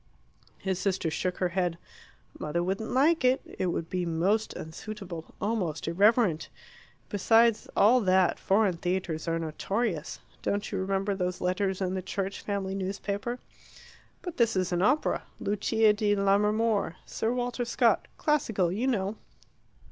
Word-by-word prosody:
His 190 Hz, -2 st, -2 dB
sister 185 Hz, -5 st, 0 dB
shook 180 Hz, +3 st, -2 dB
her 180 Hz, -, 0 dB
head. 175 Hz, -1 st, -1 dB, 0.6 s
"Mother 165 Hz, +3 st, -1 dB
wouldn't 195 Hz, +5 st, -2 dB
like 295 Hz, +4 st, +3 dB
it. 255 Hz, +1 st, +4 dB, 0.2 s
It 185 Hz, -, +1 dB
would 170 Hz, -1 st, -2 dB
be 180 Hz, +1 st, -2 dB
most 180 Hz, +6 st, +1 dB
unsuitable 175 Hz, 0 st, -7 dB
almost 185 Hz, -9 st, -2 dB
irreverent. 195 Hz, -1 st, +3 dB, 0.6 s
Besides 225 Hz, +2 st, +3 dB
all 245 Hz, +5 st, +6 dB
that, 185 Hz, -2 st, +3 dB
foreign 195 Hz, -3 st, +2 dB
theatres 175 Hz, -2 st, -2 dB
are 165 Hz, 0 st, +1 dB
notorious. 165 Hz, +2 st, -2 dB, 0.2 s
Don't 205 Hz, +1 st, -2 dB
you 200 Hz, -, -1 dB
remember 195 Hz, +1 st, 0 dB
those 180 Hz, -1 st, -2 dB
letters 190 Hz, +1 st, -1 dB
in 185 Hz, -1 st, 0 dB
the 190 Hz, -, -2 dB
'Church 195 Hz, +1 st, -4 dB
Family 195 Hz, -2 st, -2 dB
Newspaper'?" 200 Hz, +4 st, -3 dB, 0.9 s
"But 355 Hz, -3 st, -6 dB
this 230 Hz, -3 st, +3 dB
is 185 Hz, -1 st, 0 dB
an 175 Hz, 0 st, +1 dB
opera 270 Hz, +10 st, +2 dB, 0.2 s
'Lucia 210 Hz, +1 st, +2 dB
di 205 Hz, 0 st, +1 dB
Lammermoor' 205 Hz, 0 st, +2 dB
Sir 225 Hz, -, -2 dB
Walter 245 Hz, 0 st, -1 dB
Scott 235 Hz, -, +2 dB
classical, 220 Hz, -, +1 dB
you 225 Hz, +8 st, -1 dB
know." 210 Hz, -4 st, 0 dB
195 Hz, 140 wpm, -28 LUFS, 180-220 Hz, 0.9 s, all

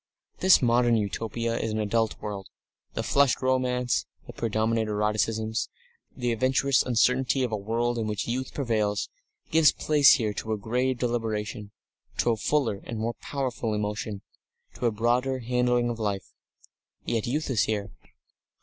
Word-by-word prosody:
This 185 Hz, -6 st, +6 dB
modern 120 Hz, -1 st, +4 dB
Utopia 115 Hz, +3 st, -2 dB
is 115 Hz, -, -2 dB
an 110 Hz, -, -2 dB
adult 110 Hz, +1 st, 0 dB
world. 100 Hz, -2 st, -6 dB, 0.5 s
The -, -, -1 dB
flushed 140 Hz, -2 st, +3 dB
romance, 125 Hz, -1 st, +1 dB, 0.2 s
the -, -, -10 dB
predominant 110 Hz, 0 st, 0 dB
eroticisms, 110 Hz, +2 st, 0 dB, 0.5 s
the 125 Hz, -2 st, 0 dB
adventurous 130 Hz, +3 st, +2 dB
uncertainty 125 Hz, +2 st, +2 dB
of 125 Hz, -, -1 dB
a -, -, 0 dB
world 115 Hz, +3 st, -1 dB
in 110 Hz, -, -1 dB
which 105 Hz, -2 st, -2 dB
youth 130 Hz, +3 st, -2 dB
prevails, 110 Hz, -6 st, -1 dB, 0.4 s
gives 160 Hz, -1 st, +6 dB
place 150 Hz, -2 st, +5 dB
here 110 Hz, -6 st, -1 dB
to 110 Hz, +1 st, -3 dB
a -, -, -1 dB
grave 125 Hz, +4 st, 0 dB
deliberation, 110 Hz, -3 st, -2 dB, 0.5 s
to 120 Hz, -, +2 dB
a -, -, +2 dB
fuller 115 Hz, -5 st, 0 dB
and 115 Hz, -, -6 dB
more 115 Hz, +2 st, -1 dB
powerful 125 Hz, -5 st, -2 dB
emotion, 105 Hz, -1 st, -3 dB, 0.5 s
to 120 Hz, -, -1 dB
a -, -, +2 dB
broader 120 Hz, +4 st, +1 dB
handling 125 Hz, 0 st, +1 dB
of 120 Hz, -1 st, -3 dB
life. 100 Hz, -3 st, -3 dB, 0.7 s
Yet 115 Hz, -1 st, -1 dB
youth 145 Hz, +3 st, -1 dB
is 110 Hz, -5 st, +2 dB
here. 105 Hz, -2 st, -2 dB
115 Hz, 150 wpm, -27 LUFS, 110-125 Hz, 0.7 s, This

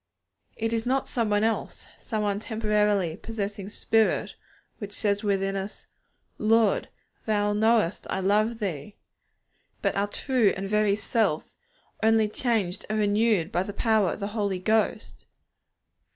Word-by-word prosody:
It 225 Hz, +1 st, -2 dB
is 225 Hz, +1 st, -1 dB
not 265 Hz, +1 st, +1 dB
some 230 Hz, -3 st, -1 dB
one 205 Hz, 0 st, +2 dB
else, 225 Hz, 0 st, -2 dB
some 210 Hz, -3 st, -2 dB
temporarily 210 Hz, -6 st, 0 dB
possessing 205 Hz, -3 st, -5 dB
spirit, 220 Hz, +1 st, +1 dB, 0.4 s
which 205 Hz, -2 st, -7 dB
says 205 Hz, 0 st, 0 dB
within 195 Hz, -1 st, 0 dB
us, 195 Hz, +1 st, -6 dB, 0.5 s
'Lord, 220 Hz, -1 st, +3 dB, 0.4 s
Thou 205 Hz, -1 st, +1 dB
knowest 220 Hz, -3 st, +2 dB
that -, -, -8 dB
I -, -, -1 dB
love 210 Hz, +4 st, +2 dB
Thee,' 195 Hz, -3 st, -4 dB, 0.9 s
but -, -, +1 dB
our 200 Hz, +1 st, +1 dB
true 240 Hz, -1 st, +1 dB
and 195 Hz, +1 st, -4 dB
very 210 Hz, 0 st, +2 dB
self, 205 Hz, -6 st, 0 dB, 0.5 s
only 220 Hz, -1 st, +4 dB
changed 210 Hz, -5 st, -1 dB
and 215 Hz, -, 0 dB
renewed 210 Hz, -3 st, +2 dB
by 175 Hz, -, +1 dB
the 200 Hz, +2 st, -5 dB
power 215 Hz, -4 st, +2 dB
of -, -, -8 dB
the 200 Hz, 0 st, -3 dB
Holy 200 Hz, -4 st, -1 dB
Ghost. 215 Hz, +4 st, -1 dB
210 Hz, 140 wpm, -26 LUFS, 200-220 Hz, 0.9 s, only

